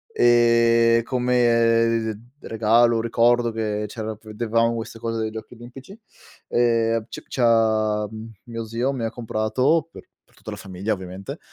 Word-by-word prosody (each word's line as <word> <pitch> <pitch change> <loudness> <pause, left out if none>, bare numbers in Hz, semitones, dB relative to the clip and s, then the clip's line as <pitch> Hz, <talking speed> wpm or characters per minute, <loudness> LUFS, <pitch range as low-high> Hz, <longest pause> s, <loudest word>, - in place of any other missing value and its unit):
Ehm, 115 -1 +4
come 115 -2 +2
d 120 +6 -16
regalo, 115 +1 +3
ricordo 120 +1 +2
che 105 -1 -3
c'era 110 0 -6
vedevamo 115 +1 0
queste 115 0 -6
cose 115 0 -4
dei 110 - -2
Giochi 110 +2 -9
Olimpici, 125 - -13 0.5
ehm, 115 -2 +1
c - - -8
c'ha 110 -3 +1 0.4
mio 115 -2 -6
zio 115 +4 -2
mi 130 -4 -4
ha 115 - -2
comprato, 125 +7 0
per - - -12 0.3
per - - -29
tutta - - -9
la - - -7
famiglia 95 +3 -4
ovviamente, 95 0 -8
115 Hz, 140 wpm, -22 LUFS, 110-120 Hz, 0.5 s, Ehm